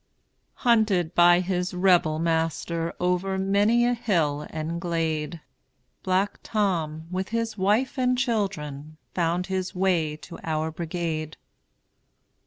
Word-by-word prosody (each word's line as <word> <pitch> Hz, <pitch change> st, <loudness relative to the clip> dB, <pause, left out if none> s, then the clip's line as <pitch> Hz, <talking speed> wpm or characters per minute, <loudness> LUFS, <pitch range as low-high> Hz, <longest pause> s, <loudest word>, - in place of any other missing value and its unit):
Hunted 210 Hz, -8 st, +3 dB
by 175 Hz, 0 st, +6 dB
his 180 Hz, 0 st, -2 dB
Rebel 180 Hz, -4 st, +3 dB
master 165 Hz, +1 st, -1 dB
Over 180 Hz, +2 st, 0 dB
many 205 Hz, +5 st, +3 dB
a 245 Hz, -, +2 dB
hill 160 Hz, -11 st, 0 dB
and 160 Hz, +2 st, -4 dB
glade, 165 Hz, -2 st, -2 dB, 0.6 s
Black 190 Hz, +2 st, 0 dB
Tom, 165 Hz, -7 st, -1 dB
with 190 Hz, +1 st, -2 dB
his 230 Hz, -1 st, -2 dB
wife 215 Hz, +8 st, +1 dB
and 250 Hz, 0 st, +2 dB
children, 160 Hz, -, -2 dB, 0.2 s
Found 175 Hz, +1 st, 0 dB
his 190 Hz, 0 st, -3 dB
way 175 Hz, -5 st, +1 dB
to 170 Hz, -, -11 dB
our 160 Hz, 0 st, -1 dB
brigade. 160 Hz, -1 st, -4 dB
180 Hz, 115 wpm, -25 LUFS, 160-195 Hz, 0.6 s, by